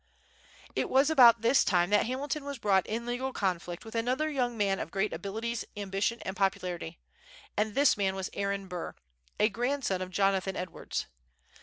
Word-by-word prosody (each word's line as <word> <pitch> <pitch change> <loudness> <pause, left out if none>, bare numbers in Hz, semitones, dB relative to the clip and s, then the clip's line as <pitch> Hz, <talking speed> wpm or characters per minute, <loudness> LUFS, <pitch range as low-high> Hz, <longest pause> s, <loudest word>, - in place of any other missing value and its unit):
It - - 0
was 275 +4 +4
about 235 -6 +7
this 245 +4 +5
time 175 0 +2
that 210 +1 +4
Hamilton 280 +4 -2
was 280 -1 -5
brought 195 -5 +2
in 230 +2 -3
legal 245 +2 -2
conflict 180 -4 -2
with 225 - -9
another 255 +7 0
young 245 -4 -1
man 200 -2 +1
of - - -4
great 195 +2 -1
abilities, 220 +7 -3
ambition, 200 +3 -1
and 190 - -4
popularity; 180 -4 -1 0.6
and 210 0 0
this 285 0 +5
man 195 -2 0
was 190 -1 -4
Aaron 200 -1 -2
Burr, 180 -2 -5 0.4
a 210 - +5
grandson 240 -3 -1
of 185 - -4
Jonathan 195 0 +1
Edwards. 180 -1 -4
210 Hz, 170 wpm, -30 LUFS, 190-245 Hz, 0.6 s, about